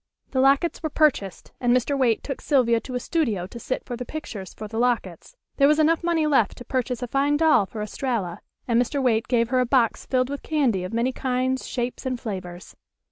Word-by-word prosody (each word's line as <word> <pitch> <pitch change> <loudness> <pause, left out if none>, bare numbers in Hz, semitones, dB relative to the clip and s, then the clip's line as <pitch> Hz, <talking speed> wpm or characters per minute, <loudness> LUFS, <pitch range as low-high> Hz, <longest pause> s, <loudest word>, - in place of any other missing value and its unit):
The 260 - 0
lockets 275 +5 +3
were 315 - -2
purchased, 275 - 0
and 245 0 +4
Mr. 265 +3 -1
Waite 250 -5 +1
took 275 - -5
Sylvia 240 -5 +3
to 250 +2 -7
a - - 0
studio 235 - -1
to 235 +6 -9
sit 255 - -4
for 245 - -5
the 250 - -5
pictures 230 -9 -7
for 215 - -8
the 225 +2 -4
lockets. 235 - -1 0.2
There 280 - +5
was 300 +1 +4
enough 320 +2 +3
money 335 -2 +1
left 270 -9 +2
to 245 - -10
purchase 255 -1 -2
a - - -3
fine 280 +4 +1
doll 310 -11 +4
for 215 0 -5
Estralla, 210 -5 -3 0.3
and 235 0 +3
Mr. 265 +4 -1
Waite 230 -4 +1
gave 235 -2 +1
her 255 0 +2
a 250 - +3
box 245 -3 +1
filled 255 0 +1
with 285 - -4
candy 260 -12 0
of 185 - -5
many 235 +3 0
kinds, 260 0 -1
shapes 245 0 -3
and 255 -1 -2
flavors. 185 -5 -7
250 Hz, 220 wpm, -24 LUFS, 230-275 Hz, 0.3 s, There